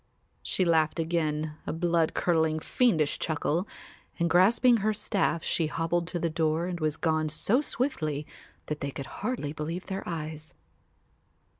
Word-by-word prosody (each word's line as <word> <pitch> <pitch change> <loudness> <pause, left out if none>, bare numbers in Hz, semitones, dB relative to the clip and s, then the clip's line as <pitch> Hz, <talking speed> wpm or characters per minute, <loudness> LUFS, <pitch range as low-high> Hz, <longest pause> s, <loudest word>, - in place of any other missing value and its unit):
She 185 - +1
laughed 160 -2 +3
again, 155 -2 -1
a - - 0
blood 165 -1 +1
curdling 160 -2 +2
fiendish 160 - +1
chuckle, 160 +4 -1 0.5
and 170 -1 +1
grasping 230 +7 +5
her 215 0 0
staff 200 -5 0
she 165 - +1
hobbled 165 +2 -1
to 175 - -2
the 170 - 0
door 160 +1 0
and 180 -1 -3
was 155 -1 0
gone 160 -2 +1
so 210 - +2
swiftly 155 - -2 0.4
that 150 0 -4
they 140 - -2
could 140 0 -6 0.2
hardly 205 - -2
believe 160 +4 -4
their 190 0 -4
eyes. 155 -1 -6
165 Hz, 150 wpm, -28 LUFS, 155-180 Hz, 0.5 s, grasping